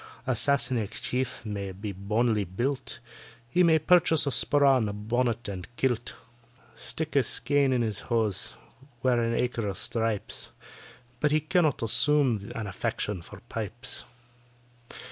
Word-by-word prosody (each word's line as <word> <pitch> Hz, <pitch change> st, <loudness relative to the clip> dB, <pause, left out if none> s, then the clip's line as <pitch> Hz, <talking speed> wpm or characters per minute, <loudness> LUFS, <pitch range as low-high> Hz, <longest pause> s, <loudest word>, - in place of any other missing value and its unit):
A 130 Hz, -, +1 dB
Sassenach 120 Hz, -5 st, +1 dB
chief 125 Hz, -2 st, -2 dB
may 100 Hz, -2 st, -4 dB
be 100 Hz, +2 st, -5 dB
bonily 105 Hz, +3 st, +1 dB
built, 120 Hz, +10 st, -2 dB, 0.5 s
He 175 Hz, +10 st, +2 dB
may 165 Hz, -2 st, +6 dB
purchase 160 Hz, -1 st, +4 dB
a 140 Hz, -, 0 dB
sporran, 135 Hz, -3 st, +4 dB
a -, -, -4 dB
bonnet, 115 Hz, +2 st, -1 dB
and 95 Hz, -3 st, -5 dB
kilt; 120 Hz, -3 st, 0 dB, 0.6 s
Stick 155 Hz, -1 st, -4 dB
a -, -, +7 dB
skeän 140 Hz, +1 st, +1 dB
in 125 Hz, -2 st, +2 dB
his 110 Hz, -3 st, -2 dB
hose—wear 120 Hz, +3 st, -1 dB
an 115 Hz, 0 st, 0 dB
acre 120 Hz, -3 st, -1 dB
of 95 Hz, -2 st, -3 dB
stripes— 110 Hz, -1 st, -2 dB, 0.7 s
But 150 Hz, -, +3 dB
he 155 Hz, +1 st, +3 dB
cannot 155 Hz, -4 st, +1 dB
assume 120 Hz, -3 st, +3 dB
an 115 Hz, -, -3 dB
affection 100 Hz, 0 st, -2 dB
for -, -, -12 dB
pipes. 115 Hz, +1 st, -6 dB
120 Hz, 135 wpm, -28 LUFS, 105-140 Hz, 0.7 s, a